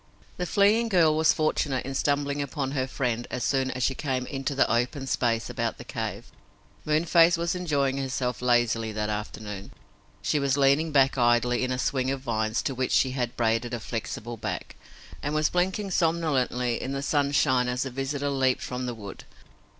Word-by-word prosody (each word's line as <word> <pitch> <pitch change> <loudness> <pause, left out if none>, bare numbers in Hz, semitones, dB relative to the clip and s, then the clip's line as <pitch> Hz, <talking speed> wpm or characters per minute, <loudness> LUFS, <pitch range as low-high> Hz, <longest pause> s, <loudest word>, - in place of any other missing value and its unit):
The 180 - -2
fleeing 215 +5 +3
girl 165 -6 +4
was 160 0 +4
fortunate 145 -4 0
in 135 - -4
stumbling 145 +1 0
upon 140 -1 -3
her 130 -2 -1
friend 120 -3 -2
as 125 - -3
soon 135 -1 +1
as 130 -1 -3
she 135 - +2
came 130 -2 -2
into 135 +1 -3
the 135 - +4
open 125 +4 0
space 115 -3 0
about - - -2
the - - -9
cave. - - -5 0.5
Moonface 165 +2 +4
was 170 0 -1
enjoying 145 -7 0
herself 130 -2 -2
lazily 120 -2 +2
that 105 0 -2
afternoon. 105 -1 -6 0.5
She 150 - +1
was 140 -1 +1
leaning 140 +3 +3
back 135 -2 +3
idly 120 +1 +3
in 130 - -1
a 125 - -1
swing 130 +1 0
of 135 -1 -2
vines 110 -3 -1
to 135 - -1
which 130 0 -2
she 130 - +3
had 125 -2 -3
braided 115 +1 0
a - - -5
flexible 115 +1 -5
back, - - -5 0.5
and 145 +1 -2
was 155 0 +2
blinking 190 +3 0
somnolently 145 -8 +1
in 135 - -3
the 135 0 -3
sunshine 140 -3 +2
as 125 +1 -1
the 135 - -5
visitor 140 +2 -2
leaped 130 -2 +1
from 125 0 -4
the 120 - -4
wood. 100 -3 -9
135 Hz, 185 wpm, -26 LUFS, 125-145 Hz, 0.5 s, girl